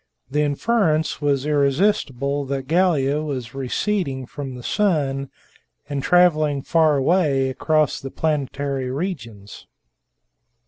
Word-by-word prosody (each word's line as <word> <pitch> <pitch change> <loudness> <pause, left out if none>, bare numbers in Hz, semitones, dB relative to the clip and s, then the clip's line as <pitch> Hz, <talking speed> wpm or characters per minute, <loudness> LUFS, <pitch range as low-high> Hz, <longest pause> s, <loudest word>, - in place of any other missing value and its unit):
The 150 +2 +1
inference 155 +1 +1
was 140 -2 +1
irresistible 140 -2 +1
that 135 -1 -4
Gallia 155 -4 +2
was 130 -6 -5
receding 135 +1 -2
from 135 0 -7
the 125 - -9
sun, 140 - 0 0.6
and 145 -2 -3
traveling 155 -5 +3
far 160 -3 +3
away 135 -3 +2
across 155 +2 +1
the 135 - -6
planetary 140 -3 -2
regions. 125 - -6
145 Hz, 105 wpm, -22 LUFS, 135-160 Hz, 0.6 s, traveling